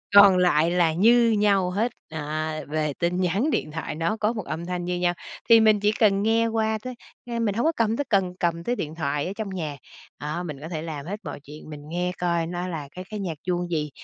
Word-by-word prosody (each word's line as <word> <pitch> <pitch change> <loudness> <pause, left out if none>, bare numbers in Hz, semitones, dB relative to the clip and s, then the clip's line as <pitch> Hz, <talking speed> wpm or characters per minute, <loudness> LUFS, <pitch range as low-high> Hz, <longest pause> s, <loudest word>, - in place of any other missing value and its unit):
Còn 200 -2 +9
lại 170 -2 +3
là 170 -3 +3
như 230 +5 +5
nhau 200 -3 +3
hết, 225 +6 0 0.2
à, 155 0 -3
về 150 -1 -1
tin 175 +2 0
nhắn 195 - +1
điện 150 - -1
thoại 160 -1 -4
nó 165 +7 -1
có 215 +2 +1
1 210 -5 -5
âm 170 +2 -4
thanh 180 -1 -3
như 180 0 -2
nhau, 175 0 +2 0.4
thì 230 0 +9
mình 215 -1 +5
chỉ 205 +1 +3
cần 200 -2 +4
nghe 225 +1 +3
qua 220 -1 0
tới, 255 -1 -5 0.3
ờ, 235 -1 -2
mình 210 -3 0
hổng 235 - 0
có 325 - +4
cầm 225 0 +1
tới 285 - -1
cần 190 -4 +2
cầm 170 -1 0
tới 240 +7 0
điện 155 -7 -5
thoại 145 -1 -1
ở 190 - -4
trong 215 -3 -3
nhà. 155 -6 -4 0.4
Đó, 155 +4 -3
mình 150 -5 -6
có 160 - -7
thể 160 -3 -4
làm 155 -3 -6
hết 205 +4 -4
mọi - - -6
chuyện, 150 +1 -11
mình 150 -1 -7
nghe 180 +1 -1
coi 170 -2 0
nó 175 +1 -3
là 155 -5 -5
cái 185 +1 -8
cái 215 - -5
nhạc 180 -5 -3
chuông 175 -1 -1
gì 150 -2 -1
180 Hz, 250 wpm, -25 LUFS, 160-210 Hz, 0.4 s, Còn